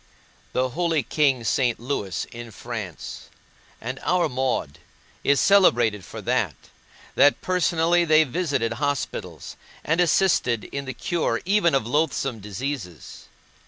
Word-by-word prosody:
The 130 0 +1
holy 165 0 0
king 135 -5 +1
St. 120 0 +1
Louis, 115 -6 -3
in 120 0 -8
France, 110 -5 -7 0.5
and 130 +3 -5
our 180 -1 +2
Maud, 125 - -2 0.4
is 140 0 +3
celebrated 120 - +4
for - - -9
that, - - 0 0.6
that 145 - +4
personally 175 -1 +2
they 155 -1 +5
visited 135 -6 -1
hospitals, 145 -2 -3 0.3
and 165 +3 +1
assisted 165 - +2
in 140 0 -6
the 130 -2 -6
cure 170 +6 -1
even 190 -5 +3
of 135 -5 +1
loathsome 135 -3 0
diseases. 105 - -6
135 Hz, 125 wpm, -24 LUFS, 120-165 Hz, 0.6 s, they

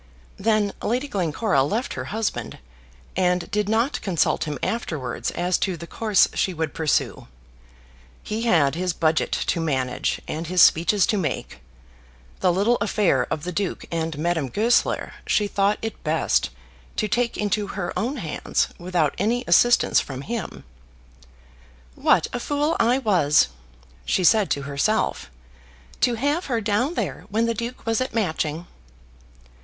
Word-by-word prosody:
Then 210 -1 +1
Lady 250 +5 -1
Glencora 185 - 0
left 215 - -1
her - - -5
husband, 220 0 -3 0.6
and 180 -1 +1
did 210 -1 0
not 230 +6 +1
consult 180 -4 +1
him 150 -2 -4
afterwards 155 - -2
as 180 +1 0
to 185 -3 -1
the 170 - -8
course 215 +3 +3
she 185 - 0
would 160 -2 -2
pursue. 160 -2 0 1.0
He 215 +1 -3
had 150 - +3
his 180 +2 -1
budget 160 -2 +1
to 170 - 0
manage, 130 -5 -1
and 160 +2 -4
his 180 +2 0
speeches 175 +5 +5
to 210 - 0
make. 155 - -3 0.8
The 180 - +3
little 205 +7 +2
affair 205 -1 +1
of 150 - -3
the 180 - -3
Duke 195 +1 -3
and 165 -2 -2
Madame 160 -3 -1
Goesler, 225 - +1
she 210 - +2
thought 200 +1 +1
it 225 - -5
best 155 - +1 0.5
to 215 - 0
take 235 +3 0
into 210 0 0
her 195 -2 -4
own 235 +10 -1
hands 165 -10 -1
without 175 -4 0
any 235 +5 +1
assistance 240 0 +4
from 135 -2 -5
him. 230 0 -5 1.3
"What - - +3
a 245 - -2
fool 295 +5 0
I 240 +3 +4
was," 175 - +3 0.5
she 185 - 0
said 210 +2 +4
to 140 - -1
herself, 140 - 0 0.7
"to 240 +1 +2
have 290 +9 0
her 240 -4 0
down 225 +9 0
there - - -3
when 225 +2 +1
the 230 - 0
Duke 235 +3 -6
was 225 +1 +1
at 255 - -3
Matching!" 160 -5 -1
195 Hz, 150 wpm, -23 LUFS, 165-225 Hz, 1.3 s, speeches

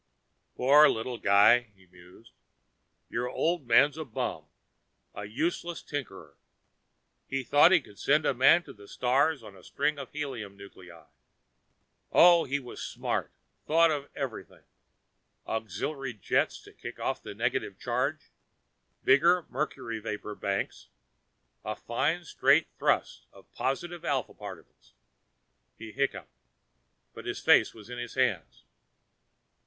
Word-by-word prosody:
"Poor 145 +4 +6
little 115 +1 -3
guy," 100 +4 +6 0.2
he 95 -1 -23
mused. 90 +5 -18 0.8
"Your 120 +2 -3
old 165 -3 -1
man's 140 +6 +4
a - - -3
bum, 120 - -4 0.7
a 105 - -7
useless 165 +9 -3
tinker. 95 - -7 0.9
He 135 0 -2
thought 145 +7 +5
he 185 -4 +5
could 100 -6 -17
send 150 +3 +3
Man 140 +8 +5
to - - -12
the 100 -1 -16
stars 135 +4 +1
on 105 -2 -12
a 95 - -17
string 145 +1 -1
of 135 - -8
helium 125 -10 -6
nuclei. 90 -5 -14 1.1
Oh, 170 -1 +6
he 140 +2 -1
was 125 -3 -10
smart. - - -3 0.4
Thought 165 +1 +4
of 145 -2 -3
everything. 135 -5 -6 0.8
Auxiliary 115 - -4
jets 100 - 0
to - - -15
kick - - -9
off - - -2
the - - -9
negative - - -2
charge, - - -2 0.7
bigger 170 +6 +4
mercury 120 -5 -4
vapor 105 -1 -5
banks 100 -1 -3 0.8
a 110 +1 -4
fine 155 +9 -1
straight 145 -1 +3
thrust - - 0
of - - -19
positive 170 +6 -3
Alpha 135 -7 -1
particles." 100 -4 -12 0.8
He 110 0 -9
hiccuped, 95 - -3 0.7
put - - -10
his - - -3
face - - +4
in 115 +3 -9
his 120 -1 -7
hands. 90 - -1
125 Hz, 125 wpm, -28 LUFS, 105-145 Hz, 1.1 s, Poor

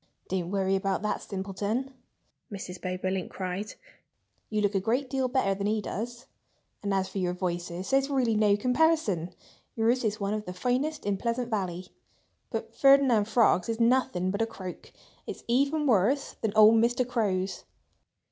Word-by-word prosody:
"Don't 180 -2 -2
worry 195 0 +1
about 195 +1 -1
that 210 - -1
simpleton!" 205 +7 -3 0.6
Mrs. 185 -2 -7
Bobolink 185 0 -2
cried. 190 +3 -5 0.7
"You 215 -1 0
look 205 0 +1
a 195 - +2
great 245 +6 -1
deal 265 -2 +1
better 250 -6 +1
than 200 +1 -2
he 215 +1 +1
does. 235 +4 -5 0.6
And 205 - -2
as 190 -1 +1
for 190 +1 -5
your 180 -1 0
voices, 175 +2 -4
there's 270 +1 +3
really 255 -5 +1
no 210 -1 +4
comparison. 250 - +1 0.4
Yours 235 +3 +2
is 215 -1 -1
one 200 0 -1
of 215 0 -3
the 180 - -6
finest 255 +10 -1
in 200 -1 0
Pleasant 235 +3 -2
Valley; 185 -3 -3 0.6
but - - -5
Ferdinand 275 -6 +5
Frog's 220 -4 +3
is 225 0 -2
nothing 230 -6 +2
but 200 +3 -2
a 225 - +1
croak. 190 -5 -9 0.4
It's - - -7
even 280 +5 +2
worse 250 +3 +2
than 220 - 0
old 215 +1 +7
Mr. 240 +1 +1
Crow's!" 200 -6 -1
210 Hz, 165 wpm, -28 LUFS, 190-245 Hz, 0.7 s, old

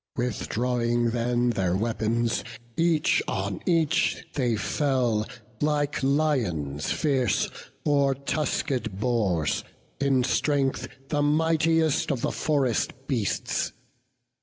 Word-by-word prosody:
Withdrawing 120 0 0
then 120 +1 +1
their 95 -5 0
weapons, 115 +2 0 0.3
each 165 -2 +3
on 95 0 -2
each 165 -4 +2
They 125 -5 +1
fell, 120 -1 0 0.3
like 145 -1 0
lions 115 - 0
fierce, 135 -8 +1 0.4
or 140 -2 +3
tusked 135 -6 -2
boars, 100 - +1 0.4
In 135 -2 +2
strength 135 0 +1 0.2
the 145 -1 +1
mightiest 160 +1 +2
of 130 -4 -2
the - - 0
forest 140 -6 0
beasts. 120 -9 -1
125 Hz, 95 wpm, -26 LUFS, 115-145 Hz, 0.4 s, each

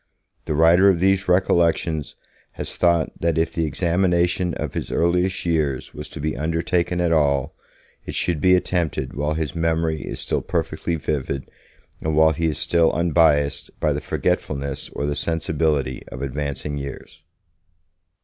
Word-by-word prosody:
The 75 - -1
writer 85 +5 +6
of 90 -3 +2
these 95 +1 +2
recollections 85 -4 +1 0.4
has - - -5
thought 85 -2 +2
that 85 -1 0
if 80 0 0
the 85 - 0
examination 85 +2 +1
of - - -4
his - - -4
earliest 90 +3 +1
years 75 -6 -1
was 75 0 -8
to - - -9
be 75 -1 -2
undertaken 85 +4 0
at 85 -1 +1
all, 75 -2 +2 0.5
it - - -6
should 85 -4 0
be 90 0 +5
attempted 85 -7 -1
while 75 +2 -1
his 80 -1 -2
memory 80 -2 0
is - - -6
still - - -1
perfectly 85 - -2
vivid 70 -3 -3 0.5
and 80 -1 -1
while 80 +1 +5
he 80 +2 -1
is 75 - -1
still 85 -1 +3
unbiased 80 -4 +2
by - - +1
the - - -3
forgetfulness 70 0 -2
or 70 - -4
the 75 - 0
sensibility 75 -5 0
of 65 - -7
advancing 70 +1 -3
years. 70 0 -9
80 Hz, 155 wpm, -22 LUFS, 75-85 Hz, 0.5 s, writer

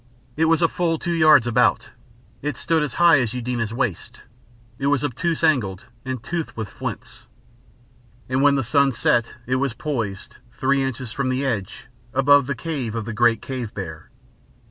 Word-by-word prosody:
It 160 - +2
was 165 +1 +3
full 165 0 +1
two 170 - -3
yards 155 -6 +6
about, 120 -2 +2 0.5
it 145 -2 -3
stood 165 -1 +1
as 145 -4 -3
high 170 -4 +6
as 120 0 -2
Eudena's 120 -3 -2
waist, 115 -6 -3 0.6
it 140 - -1
was 145 -1 +2
obtuse 165 +5 -2
angled 115 - +1 0.2
and 130 -3 -5
toothed 165 0 -4
with 110 -3 -4
flints. - - -7 1.0
And 130 +1 0
when 145 0 +5
the 135 - 0
sun 140 +3 +3
set 115 +1 +1
it 130 +1 0
was 130 -2 -1
poised, 115 -9 -4 0.2
three 135 0 +2
inches 130 -3 -3
from 135 +2 -2
the 130 +2 -1
edge, 105 -8 -3 0.3
above 140 0 +5
the 140 - -2
cave 125 -5 -4
of 115 -2 -3
the 115 - -5
great 115 +1 +2
cave 125 -5 -5
bear. 80 -6 -7
130 Hz, 170 wpm, -22 LUFS, 115-145 Hz, 1.0 s, yards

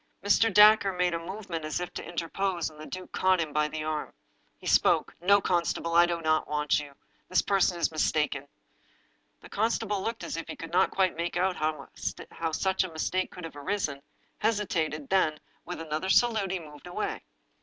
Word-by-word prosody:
Mr. 215 +3 +4
Dacre 210 -1 +7
made 180 -1 +1
a 165 - -1
move 190 +5 -7
ment 165 -3 -4
as 155 +1 -2
if 180 - -5
to - - -5
interpose. 175 +1 -2
The 155 0 -11
duke 185 0 -8
caught 185 -1 +2
him 155 -3 -2
by 150 0 +2
the 155 0 -5
arm. 155 -1 -3 0.4
He - - -16
spoke: - - +3
"No, 200 +3 +5
constable, 170 -2 0
I 170 +1 +6
do 170 -1 -1
not 155 0 +2
want 150 -1 +1
you. 145 -1 -9 0.3
This 185 - +3
person 195 -3 +2
is 170 - +1
mistaken." 150 -2 0 0.9
The - - -13
constable 210 -2 0
looked 230 +2 -3
as - - -4
if 165 - -5
he - - -6
could 165 0 -9
not 185 +2 +4
quite 190 -1 +1
make 170 +1 -2
out 185 +1 +1
how 155 +1 -4
such 190 +4 +1
a 185 - -6
mistake 185 +3 -1
could 180 - -10
have 165 -2 -7
arisen, 145 -2 -2 0.4
hesitated, 170 -9 0
then, 160 -6 +2 0.3
with 180 0 -6
another 160 +3 -3
salute, 220 -2 +3
he 190 - -1
moved 150 -1 -12
away. 175 - -3
175 Hz, 190 wpm, -28 LUFS, 155-190 Hz, 0.9 s, Dacre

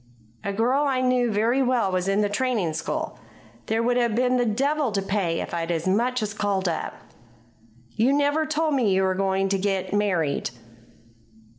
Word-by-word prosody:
"A 200 - -2
girl 245 +8 +1
I 265 -2 +1
know 250 -1 +2
very 225 +5 +1
well 245 -6 +1
was 185 0 -1
in 195 +2 +2
the 205 - +2
training 210 -6 -1
school. 155 - -4 0.5
There 225 +1 0
would 245 +1 +2
have 235 -3 +1
been 250 +1 +2
the 245 -1 +1
devil 275 +4 0
to 200 - 0
pay 195 -4 -1
if - - -6
I'd 165 -1 -2
as 170 0 -1
much 240 +5 +1
as 210 -1 -3
called 200 -3 -1
up." 165 -2 -3 1.0
"You 235 - +2
never 290 +2 +2
told 310 0 0
me 245 -7 +2
you 190 0 +2
were 190 0 +2
going 195 0 0
to 195 0 0
get 190 -1 -1
married." 180 -8 0
210 Hz, 185 wpm, -24 LUFS, 190-255 Hz, 1.0 s, know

